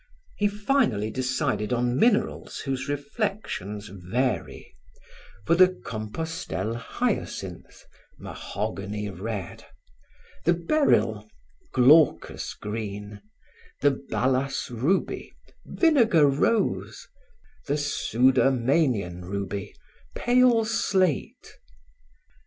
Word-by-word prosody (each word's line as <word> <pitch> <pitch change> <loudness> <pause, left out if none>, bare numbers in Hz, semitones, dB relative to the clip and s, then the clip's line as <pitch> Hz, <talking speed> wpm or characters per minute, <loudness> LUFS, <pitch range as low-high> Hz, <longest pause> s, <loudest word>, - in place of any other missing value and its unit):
He 205 - +2
finally 205 - 0
decided 130 -3 -1
on 120 0 +1
minerals 220 - +1
whose 135 0 -3
reflections 145 - -3
vary; 100 +8 -3 0.7
for - - +3
the 185 +2 +7 0.2
Compostelle 110 - -4
hyacinth, 120 - -4 0.3
mahogany 105 0 -5
red; 95 +1 -6 0.8
the 170 +2 +3
beryl, 165 - +1 0.4
glaucous 145 +5 +4
green; 105 -1 -6 0.6
the 145 - +5
balas 135 0 -1
ruby, 135 +12 -1 0.3
vinegar 235 - +4
rose; 150 +11 0 0.6
the 145 +1 +1
Sudermanian 130 - +2
ruby, 100 +1 -5 0.4
pale 245 -2 +4
slate. 190 - -1
130 Hz, 75 wpm, -26 LUFS, 105-170 Hz, 0.8 s, the